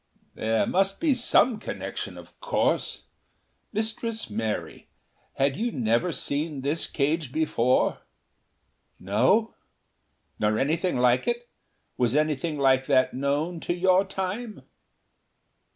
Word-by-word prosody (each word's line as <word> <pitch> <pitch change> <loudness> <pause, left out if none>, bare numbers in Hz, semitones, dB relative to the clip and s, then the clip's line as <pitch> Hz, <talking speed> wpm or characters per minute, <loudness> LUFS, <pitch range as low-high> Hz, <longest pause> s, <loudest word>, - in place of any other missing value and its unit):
"There 110 0 0
must 195 +1 +1
be 315 -4 +3
some 245 -2 +3
connection, - - -5
of - - -14
course.... - - 0 0.7
Mistress 220 - -2
Mary, 110 0 -4 0.5
had 135 0 +1
you 235 +3 -1
never 120 - +1
seen 145 -1 -2
this 145 +4 0
cage 150 -1 -1
before?" 130 -5 +1 1.0
"No." 125 - +2 0.9
"Nor 105 0 +1
anything 160 +5 0
like 125 0 +3
it? 240 0 -2 0.5
Was 125 0 +1
anything 155 +1 0
like 135 -1 +3
that 130 -3 +3
known 145 +6 -1
to 175 - -2
your 185 +1 +4
Time?" 195 +4 -5
155 Hz, 110 wpm, -26 LUFS, 130-195 Hz, 1.0 s, your